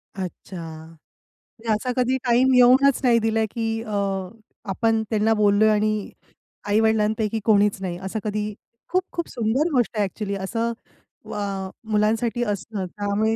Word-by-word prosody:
अच्छा. 185 Hz, 0 st, -7 dB, 1.0 s
म्हणजे 225 Hz, -1 st, -1 dB
असा 215 Hz, +4 st, -1 dB
कधी 255 Hz, +1 st, +2 dB
टाईम 255 Hz, +2 st, +4 dB
येऊनच 255 Hz, +2 st, +6 dB
नाही 235 Hz, -2 st, +5 dB
दिला, 225 Hz, 0 st, +1 dB
की 225 Hz, -1 st, -2 dB
अ, 215 Hz, -, -8 dB, 0.8 s
आपण 225 Hz, +3 st, +1 dB
त्यांना 220 Hz, 0 st, +2 dB
बोललोय 210 Hz, 0 st, +4 dB
आणि 215 Hz, -1 st, +1 dB, 0.6 s
आई-वडिलांपैकी 220 Hz, 0 st, +2 dB
कोणीच 205 Hz, -2 st, +3 dB
नाही 180 Hz, -2 st, -3 dB
असं 195 Hz, +3 st, -3 dB
कधी 210 Hz, 0 st, -2 dB, 0.4 s
खूप-खूप 365 Hz, -1 st, -2 dB
सुंदर 245 Hz, +7 st, 0 dB
गोष्ट 240 Hz, -2 st, +1 dB
आहे 210 Hz, -, +3 dB
ॲक्चुअली. 200 Hz, +1 st, -4 dB
असं 225 Hz, +4 st, -2 dB, 0.6 s
अ, 195 Hz, -2 st, -3 dB, 0.2 s
मुलांसाठी 225 Hz, +3 st, +1 dB
असतं. 200 Hz, -1 st, -5 dB
त्यामुळे 205 Hz, +4 st, -1 dB
220 Hz, 130 wpm, -23 LUFS, 205-235 Hz, 1.0 s, येऊनच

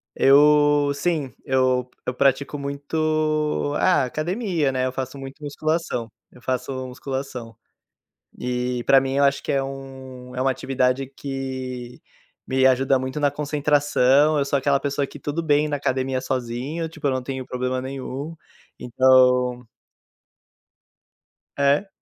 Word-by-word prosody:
Eu 145 Hz, +1 st, +5 dB
sim, 145 Hz, -2 st, -1 dB
eu 130 Hz, -1 st, +1 dB, 0.2 s
eu 125 Hz, -, -1 dB
pratico 140 Hz, +2 st, +1 dB
muito, 155 Hz, +1 st, -1 dB
ah, 180 Hz, -7 st, +3 dB
academia, 165 Hz, -, -1 dB
né, 130 Hz, 0 st, 0 dB
eu 130 Hz, -, -1 dB
faço 130 Hz, +1 st, -5 dB
muito 135 Hz, +3 st, -9 dB
musculação, 145 Hz, -5 st, -2 dB, 0.2 s
eu 125 Hz, -, -17 dB
faço 130 Hz, +1 st, -3 dB
musculação. 130 Hz, -3 st, -6 dB, 0.8 s
E, 125 Hz, 0 st, -2 dB
para 135 Hz, -, +6 dB
mim, 135 Hz, 0 st, -2 dB
eu 140 Hz, +1 st, +3 dB
acho 140 Hz, 0 st, +2 dB
que -, -, -2 dB
é 135 Hz, -1 st, +1 dB
um 130 Hz, -2 st, -9 dB
é 125 Hz, -, -3 dB
uma 135 Hz, -, +2 dB
atividade 130 Hz, 0 st, 0 dB
que 130 Hz, -2 st, -6 dB, 0.5 s
me 130 Hz, 0 st, +3 dB
ajuda 130 Hz, +1 st, +3 dB
muito 130 Hz, +2 st, -4 dB
na 145 Hz, -1 st, +2 dB
concentração. 145 Hz, 0 st, +2 dB
Eu 140 Hz, -, +2 dB
sou 140 Hz, 0 st, +1 dB
aquela 140 Hz, +1 st, +2 dB
pessoa 140 Hz, 0 st, -1 dB
que -, -, -12 dB
tudo 150 Hz, +3 st, -3 dB
bem 150 Hz, -1 st, +2 dB
na 145 Hz, -, -1 dB
academia 130 Hz, -1 st, -1 dB
sozinha, 130 Hz, +6 st, -3 dB
tipo, 160 Hz, -2 st, -6 dB
eu -, -, +3 dB
não 130 Hz, -1 st, -1 dB
tenho 130 Hz, 0 st, -5 dB
problema 125 Hz, 0 st, -2 dB
nenhum. 135 Hz, +4 st, -6 dB, 0.4 s
Então 125 Hz, 0 st, +3 dB, 1.9 s
É. 140 Hz, +7 st, +2 dB
135 Hz, 140 wpm, -23 LUFS, 130-145 Hz, 1.9 s, para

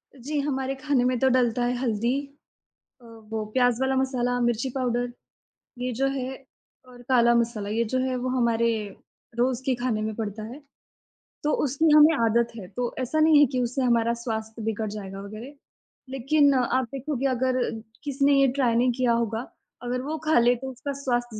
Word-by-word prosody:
जी, 285 Hz, +3 st, -3 dB
हमारे 270 Hz, -1 st, -2 dB
खाने 270 Hz, -2 st, 0 dB
में 250 Hz, 0 st, +1 dB
तो 265 Hz, -, +3 dB
डलता 245 Hz, -2 st, +2 dB
है 245 Hz, -, 0 dB
हल्दी 235 Hz, -2 st, -1 dB, 0.9 s
अ, 240 Hz, -, -19 dB
वो 225 Hz, -1 st, -6 dB
प्याज़ 245 Hz, -1 st, +2 dB
वाला 265 Hz, 0 st, +1 dB
मसाला, 250 Hz, -2 st, 0 dB
मिर्ची 240 Hz, +1 st, 0 dB
पाउडर 245 Hz, -2 st, -1 dB, 0.7 s
ये 250 Hz, 0 st, -2 dB
जो 270 Hz, +4 st, 0 dB
है 265 Hz, 0 st, -5 dB, 0.4 s
और 245 Hz, -1 st, -14 dB
काला 235 Hz, -2 st, +4 dB
मसाला, 230 Hz, -3 st, 0 dB
ये 225 Hz, +3 st, 0 dB
जो 255 Hz, +4 st, -1 dB
है 255 Hz, 0 st, -1 dB
वो 250 Hz, +1 st, -3 dB
हमारे 235 Hz, -1 st, +2 dB, 0.7 s
रोज़ 250 Hz, +1 st, +1 dB
के 265 Hz, -, +2 dB
खाने 240 Hz, -3 st, -1 dB
में 215 Hz, 0 st, -3 dB
पड़ता 215 Hz, -1 st, -5 dB
है, 240 Hz, +7 st, -8 dB, 0.8 s
तो 300 Hz, -, +1 dB
उसकी 295 Hz, +4 st, +2 dB
हमें 305 Hz, +2 st, +7 dB
आदत 235 Hz, +1 st, +2 dB
है। 195 Hz, -5 st, -8 dB
तो 240 Hz, +5 st, -4 dB
ऐसा 260 Hz, +5 st, -1 dB
नहीं 310 Hz, -1 st, +6 dB
है 290 Hz, -, +7 dB
कि 255 Hz, -, 0 dB
उससे 250 Hz, +2 st, -1 dB
हमारा 235 Hz, -2 st, +2 dB
स्वास्थ्य 220 Hz, -1 st, -4 dB
बिगड़ 220 Hz, 0 st, -2 dB
जाएगा 195 Hz, -2 st, -7 dB
वग़ैरह, 215 Hz, +7 st, -9 dB, 0.6 s
लेकिन 280 Hz, +2 st, +3 dB
आप 255 Hz, 0 st, +1 dB
देखोगे 275 Hz, 0 st, -3 dB
अगर 255 Hz, 0 st, 0 dB, 0.4 s
किसी 280 Hz, -1 st, -1 dB
ने 285 Hz, -, +5 dB
ये 275 Hz, -, +5 dB
ट्राय 255 Hz, -4 st, +1 dB
नहीं 245 Hz, +2 st, +3 dB
किया 250 Hz, -2 st, +2 dB
होगा, 230 Hz, 0 st, -2 dB, 0.3 s
अगर 250 Hz, +1 st, -2 dB
वो 305 Hz, +4 st, -4 dB
खा 310 Hz, -5 st, +4 dB
ले 240 Hz, +1 st, +4 dB
तो 265 Hz, +2 st, -6 dB
उसका 270 Hz, +3 st, -5 dB
स्वास्थ्य 240 Hz, -4 st, -1 dB
245 Hz, 185 wpm, -25 LUFS, 235-265 Hz, 0.9 s, हमें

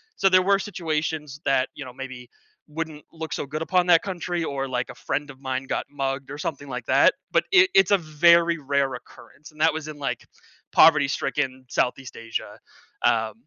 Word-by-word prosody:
so 195 Hz, -, +2 dB
there 185 Hz, 0 st, +5 dB
were 195 Hz, +1 st, +3 dB
situations 155 Hz, -6 st, -3 dB
that, 135 Hz, -1 st, +2 dB
you 145 Hz, -, -7 dB
know, 125 Hz, -, -10 dB
maybe 130 Hz, -2 st, -9 dB, 0.4 s
wouldn't 155 Hz, -1 st, -6 dB
look 160 Hz, -1 st, -6 dB
so -, -, -3 dB
good 155 Hz, +3 st, -5 dB
upon 180 Hz, +1 st, +1 dB
that 170 Hz, -2 st, +6 dB
country, 175 Hz, -2 st, -3 dB
or. 135 Hz, -3 st, -3 dB
like, 125 Hz, -1 st, -2 dB
a -, -, -9 dB
friend 145 Hz, 0 st, -3 dB
of 135 Hz, -, -17 dB
mine 130 Hz, -1 st, -3 dB
got -, -, -2 dB
mugged 135 Hz, -1 st, -3 dB
or 145 Hz, -, -6 dB
something 145 Hz, -2 st, -4 dB
like 125 Hz, -2 st, -5 dB
that, -, -, +5 dB, 0.2 s
but -, -, +3 dB
it 365 Hz, +1 st, +6 dB
it's 390 Hz, -, +5 dB
a 200 Hz, -, +6 dB
very 170 Hz, +2 st, +4 dB
rare 140 Hz, -1 st, 0 dB
occurrence, 150 Hz, +2 st, -13 dB
and 155 Hz, 0 st, -11 dB
that 160 Hz, 0 st, +4 dB
was 160 Hz, -1 st, -5 dB
in, 150 Hz, -, -8 dB
like, 140 Hz, -, -3 dB, 0.5 s
poverty-stricken 135 Hz, -3 st, +3 dB
Southeast 125 Hz, 0 st, -1 dB
Asia. 115 Hz, -1 st, -6 dB, 0.5 s
Um, 110 Hz, -1 st, +2 dB
150 Hz, 190 wpm, -24 LUFS, 135-165 Hz, 0.5 s, that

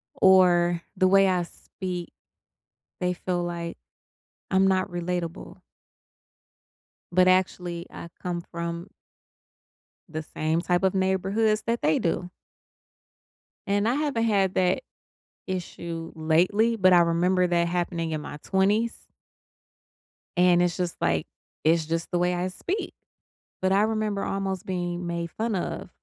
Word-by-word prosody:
or 175 Hz, -2 st, +5 dB, 0.2 s
the 185 Hz, -, +4 dB
way 195 Hz, +1 st, +5 dB
I 180 Hz, -1 st, +1 dB
speak, 180 Hz, 0 st, -7 dB, 0.9 s
they 180 Hz, 0 st, 0 dB
feel 175 Hz, 0 st, -2 dB
like 170 Hz, -1 st, -4 dB, 0.7 s
I'm 190 Hz, 0 st, +4 dB
not 190 Hz, 0 st, +1 dB
relatable. 175 Hz, -1 st, -4 dB, 1.5 s
But, 180 Hz, +1 st, +4 dB
actually, 180 Hz, -2 st, +1 dB
I 170 Hz, -, -9 dB
come 175 Hz, -1 st, -3 dB
from 170 Hz, +1 st, -5 dB, 1.2 s
the 155 Hz, 0 st, -4 dB
same 155 Hz, +2 st, -1 dB
type 175 Hz, +1 st, +1 dB
of 190 Hz, -, +3 dB
neighborhoods 195 Hz, +3 st, +1 dB
that 235 Hz, 0 st, -1 dB
they 155 Hz, +2 st, +2 dB
do. 175 Hz, +1 st, -1 dB, 1.4 s
And 205 Hz, +1 st, +1 dB
I 235 Hz, -, +2 dB
haven't 285 Hz, -6 st, 0 dB
had 195 Hz, -4 st, +2 dB
that 185 Hz, +7 st, +2 dB, 0.7 s
issue 170 Hz, -2 st, -5 dB
lately, 180 Hz, +9 st, +2 dB
but 185 Hz, -4 st, +5 dB
I 175 Hz, -, +7 dB
remember 175 Hz, +2 st, +3 dB
that 170 Hz, -1 st, +2 dB
happening 170 Hz, -1 st, -2 dB
in 155 Hz, -1 st, -2 dB
my 150 Hz, -, -7 dB
20s 205 Hz, +4 st, +1 dB, 1.4 s
and 180 Hz, -1 st, +5 dB
it's 175 Hz, -1 st, +1 dB
just 180 Hz, -2 st, -2 dB
like, 85 Hz, -2 st, +1 dB, 0.4 s
"It's 160 Hz, 0 st, +3 dB
just 165 Hz, +1 st, -2 dB
the 175 Hz, -, +1 dB
way 180 Hz, 0 st, +1 dB
I 175 Hz, +1 st, -1 dB
speak," 360 Hz, -, -4 dB, 0.7 s
but 190 Hz, -, +2 dB
I 200 Hz, +1 st, +4 dB
remember 215 Hz, -2 st, 0 dB
almost 195 Hz, -2 st, -3 dB
being 175 Hz, -1 st, -3 dB
made 170 Hz, 0 st, -3 dB
fun 225 Hz, +3 st, -2 dB
of 180 Hz, -, -3 dB
180 Hz, 130 wpm, -26 LUFS, 170-190 Hz, 1.5 s, I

